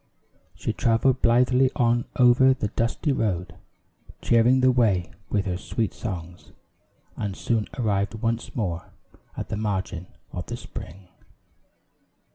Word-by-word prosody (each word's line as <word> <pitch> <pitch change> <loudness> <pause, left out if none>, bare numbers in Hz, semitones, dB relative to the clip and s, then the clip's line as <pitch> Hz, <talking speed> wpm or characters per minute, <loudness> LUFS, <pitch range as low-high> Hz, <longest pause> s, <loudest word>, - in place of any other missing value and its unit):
She - - -3
traveled 120 +2 +2
blithely 125 +2 +4
on 120 0 +2
over 125 +2 +6
the 105 -5 -2
dusty 115 +8 -1
road, 90 -9 -1 0.7
cheering 120 +3 +4
the 130 0 +5
way 105 -9 +2 0.2
with 100 -2 0
her 90 -2 -1
sweet 110 +2 -2
songs, 90 -4 -7 0.6
and 100 -2 -4
soon 115 -3 0
arrived 100 -3 0
once 115 +1 -2
more 90 -7 -3 0.4
at - - -5
the 105 - -2
margin 95 -4 -3 0.2
of 90 -3 -6
the - - -4
spring. 90 +3 -10
110 Hz, 125 wpm, -25 LUFS, 95-120 Hz, 0.7 s, over